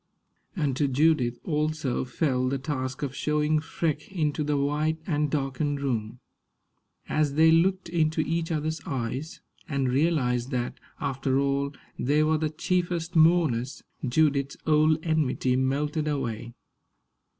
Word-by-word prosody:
And 145 -8 0
to 145 - +2
Judith 135 -3 +2
also 155 -4 -1
fell 130 -1 0
the 135 - 0
task 130 -1 -4
of 140 -2 -2
showing 150 0 +1
Freke 155 0 -3
into 155 -4 0
the 150 0 0
white 150 +3 0
and 150 -3 0
darkened 140 0 -1
room. 120 -4 -2 0.9
As 150 -2 0
they 160 +1 +6
looked 185 +3 +3
into 160 -2 +1
each 165 +1 -1
other's 155 0 -2
eyes, 130 +4 -4 0.3
and 135 -3 0
realized 130 -4 +1
that, 125 -3 -3 0.2
after 135 -1 -1
all, 140 +1 0 0.2
they 150 +4 +2
were 155 0 +2
the 155 -1 0
chiefest 175 +1 -1
mourners, 155 -7 +3 0.2
Judith's 140 +1 +1
old 155 0 +4
enmity 150 -5 +1
melted 145 +4 0
away. 120 -5 -3
150 Hz, 130 wpm, -27 LUFS, 135-155 Hz, 0.9 s, they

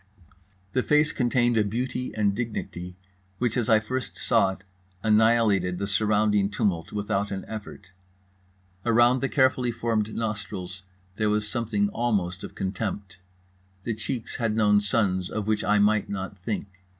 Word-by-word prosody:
The 130 - +2
face 150 +3 +3
contained 120 -2 +2
a 110 - +4
beauty 125 +4 -3
and 105 -2 +2
dignity 95 -6 -5 0.4
which, 120 -1 0
as 120 -3 0
I 110 -1 +6
first 125 +4 -4
saw - - +3
it, 95 - -15 0.4
annihilated 110 -4 +3
the 100 - -2
surrounding 105 0 +2
tumult 95 -5 -1
without 100 -1 -1
an 95 -1 -5
effort. 105 -3 -8 0.9
Around 120 +2 +4
the 135 - 0
carefully 130 -3 +2
formed 110 -2 -1
nostrils 100 -5 -4 0.4
there 110 -1 +1
was 105 0 0
something 105 -3 0
almost 100 -6 -1
of - - -8
contempt. 95 0 -4 0.6
The 115 - -1
cheeks 110 +2 -4
had 115 -3 0
known 105 -2 +4
suns 100 -3 +1
of 105 -2 -3
which 110 0 0
I 105 - +3
might 105 +1 +3
not 95 -1 -4
think. 100 +3 -4
105 Hz, 150 wpm, -26 LUFS, 100-115 Hz, 0.9 s, I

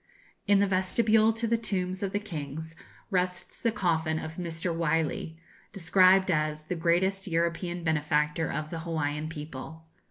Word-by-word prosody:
In 205 0 +5
the 200 - +4
vestibule 215 +4 +3
to 225 +1 -1
the 230 0 +1
tombs 185 -4 -2
of 195 -2 -1
the 205 - 0
kings 160 -4 -6 0.4
rests 180 -1 -1
the 230 - +1
coffin 165 -6 0
of 160 0 -6
Mr. 170 -1 -2
Wylie, 160 0 -1 0.4
described 185 +1 +4
as 155 -1 0
'the 180 - -3
greatest 185 +4 +1
European 170 +1 -1
benefactor 150 0 +1
of 155 0 -4
the 165 - -4
Hawaiian 155 -2 -2
people.' 160 +1 -8
170 Hz, 150 wpm, -28 LUFS, 160-190 Hz, 0.4 s, In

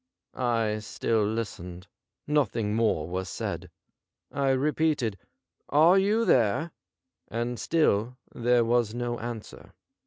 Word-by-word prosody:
I 115 -4 0
still 110 +1 -1
listened. 95 -5 -4 0.4
Nothing 115 -8 0
more 105 -9 +1
was 95 +2 -4
said. - - -4 0.6
I 140 0 0
repeated, 140 -4 +1 0.3
' - - -51
Are 165 +6 +6
you 215 +4 +2
there 125 - +2 0.3
}' - - -63 0.2
and 120 +2 -3
still 125 -7 +1 0.2
there 120 0 +2
was 120 -1 +1
no 120 -1 -2
answer. 115 -1 -8
120 Hz, 120 wpm, -27 LUFS, 105-140 Hz, 0.6 s, Are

